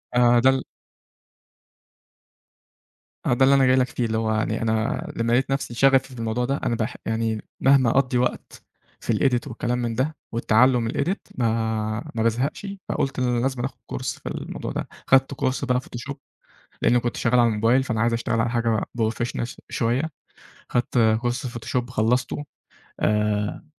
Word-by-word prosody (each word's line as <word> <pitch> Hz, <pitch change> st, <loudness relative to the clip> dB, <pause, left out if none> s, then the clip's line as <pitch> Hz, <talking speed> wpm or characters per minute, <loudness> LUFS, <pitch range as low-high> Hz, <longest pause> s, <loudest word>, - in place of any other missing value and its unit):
آآ 125 Hz, -, +5 dB, 0.2 s
ده 130 Hz, -, +7 dB
ال -, -, +1 dB, 2.7 s
ما -, -, +1 dB
هو -, -, +4 dB
ده 130 Hz, -, +3 dB
اللي 140 Hz, +1 st, +5 dB
أنا 135 Hz, -, +5 dB
جاي 130 Hz, 0 st, +5 dB
لك 130 Hz, -1 st, +3 dB
فيه. 120 Hz, -, -2 dB
اللي 110 Hz, 0 st, -1 dB
هو 110 Hz, -1 st, 0 dB
يعني 110 Hz, +1 st, -1 dB
أنا 110 Hz, 0 st, 0 dB
لمّا 115 Hz, 0 st, 0 dB
لقيت 130 Hz, +2 st, +2 dB
نفسي 135 Hz, -3 st, -2 dB
شَغَفي 135 Hz, +1 st, +3 dB
في 125 Hz, -, -10 dB
الموضوع 115 Hz, +2 st, -1 dB
ده، 135 Hz, +3 st, -1 dB
أنا 120 Hz, -, +1 dB
باح 115 Hz, +2 st, -2 dB
يعني 110 Hz, -1 st, -1 dB, 0.2 s
مهما 135 Hz, -2 st, +5 dB
أقضّي 125 Hz, 0 st, +2 dB
وقت 125 Hz, 0 st, -2 dB, 0.4 s
في -, -, -1 dB
الedit 125 Hz, 0 st, +1 dB
والكلام 120 Hz, 0 st, -2 dB
من 115 Hz, -1 st, -2 dB
ده، 140 Hz, +6 st, -1 dB, 0.2 s
والتعلّم 120 Hz, +2 st, +3 dB
من 115 Hz, -, -1 dB
الedit، 190 Hz, +4 st, 0 dB, 0.2 s
ما 110 Hz, -1 st, -1 dB
ما 110 Hz, -, 0 dB
بازهقش، 125 Hz, -, -1 dB, 0.2 s
فقُلت 135 Hz, -1 st, -1 dB
لازمًا 125 Hz, 0 st, 0 dB
أخُد 135 Hz, -, -6 dB
كورس 60 Hz, -, -4 dB
في -, -, -6 dB
الموضوع -, -, -5 dB
ده. -, -, -4 dB, 0.2 s
خدت 135 Hz, +1 st, +4 dB
كورس 135 Hz, 0 st, -1 dB
بقى 125 Hz, -1 st, +1 dB
فوتوشوب. 135 Hz, +3 st, -8 dB, 0.6 s
لإن 120 Hz, -, +4 dB
كنت 120 Hz, 0 st, -2 dB
شغّال 125 Hz, +1 st, +2 dB
على 120 Hz, -, +5 dB
الموبايل 115 Hz, +5 st, +3 dB
فأنا 115 Hz, -4 st, -1 dB
عايز 115 Hz, +1 st, +2 dB
أشتغل 115 Hz, 0 st, 0 dB
على 115 Hz, +1 st, +1 dB
حاجة 115 Hz, -2 st, +1 dB
بروفيشنال 120 Hz, +1 st, -1 dB
ش -, -, -11 dB
شوية. 125 Hz, +8 st, 0 dB, 0.6 s
خدت 120 Hz, 0 st, 0 dB, 0.2 s
كورس 120 Hz, +3 st, -2 dB
فوتوشوب 120 Hz, +1 st, -3 dB
خلّصته، 125 Hz, +4 st, 0 dB, 0.6 s
آآ 105 Hz, +3 st, 0 dB
120 Hz, 170 wpm, -24 LUFS, 115-130 Hz, 2.7 s, ده